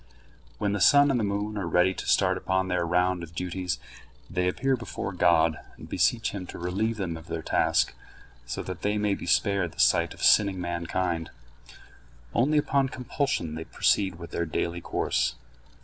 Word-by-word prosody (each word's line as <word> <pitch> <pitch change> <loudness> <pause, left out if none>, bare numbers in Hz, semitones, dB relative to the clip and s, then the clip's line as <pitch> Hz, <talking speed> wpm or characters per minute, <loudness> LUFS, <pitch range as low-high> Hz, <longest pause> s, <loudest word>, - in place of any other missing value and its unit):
When 100 -1 0
the 105 - -2
sun 145 +4 +6
and 125 - +1
the - - 0
moon 105 +1 -2
are 90 - -3
ready 90 +3 +3
to - - -7
start - - +3
upon 95 0 -1
their 90 -2 0
round 90 +1 +1
of 85 -1 -10
duties, 90 +1 -3 0.5
they 90 -2 0
appear 135 +8 +1
before 120 -5 -5
God, 80 -3 +3 0.2
and - - -11
beseech 115 -1 +1
him 95 -3 -6
to - - -8
relieve 100 +6 -1
them 90 -5 -3
of 80 +1 -13
their 80 -1 -4
task, - - +2 0.5
so - - -5
that 90 -1 -7
they 105 +1 0
may 105 -1 +1
be 95 - -6
spared 95 -1 +1
the - - -17
sight - - +3
of - - -9
sinning 100 -3 +5
mankind. 85 -1 -2 1.0
Only 145 +6 +2
upon 140 -2 +2
compulsion 125 - -2
they 80 +1 -6
proceed 95 -3 +1
with 85 0 -10
their 85 - -2
daily 85 +3 -2
course. - - 0
90 Hz, 180 wpm, -27 LUFS, 85-105 Hz, 1.0 s, sun